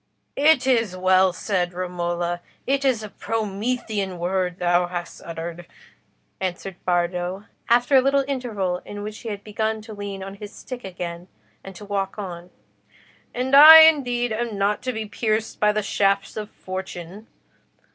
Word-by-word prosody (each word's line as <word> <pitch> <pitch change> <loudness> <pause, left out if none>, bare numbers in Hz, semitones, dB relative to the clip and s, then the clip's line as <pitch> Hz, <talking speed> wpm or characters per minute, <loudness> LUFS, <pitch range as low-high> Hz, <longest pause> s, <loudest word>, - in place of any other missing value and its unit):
"It 290 -2 +4
is 225 -8 +1
well 185 0 +4
said, 180 -1 -2
Romola. 175 -1 -3 0.2
It 275 +1 0
is 255 -5 +1
a 215 - -7
Promethean 215 -2 -3
word 180 0 -1
thou 175 0 +2
hast 175 -1 -6
uttered," 170 +1 -7 0.7
answered 185 0 -5
Bardo, 180 +2 -1 0.2
after 245 +3 +4
a 260 - +7
little 275 +1 +2
interval 210 -10 -2
in 205 0 -8
which 215 +1 -7
he 230 - -7
had 205 -1 -6
begun 220 +1 -2
to 220 0 -10
lean 200 -2 -6
on 195 0 -7
his 205 +1 -9
stick 255 -1 -9
again, 175 -2 -6 0.4
and 195 -1 -10
to 205 - -10
walk 195 -1 -3
on. 180 -3 -7 0.8
"And 255 +2 0
I 315 +3 +12
indeed 245 -7 +3
am 225 -1 -3
not 200 +1 0
to 255 - -2
be 220 -2 -4
pierced 215 +1 -2
by 210 0 +4
the 210 0 -1
shafts 195 0 0
of 215 -1 -5
Fortune. 185 +2 -8
200 Hz, 155 wpm, -23 LUFS, 180-225 Hz, 0.8 s, I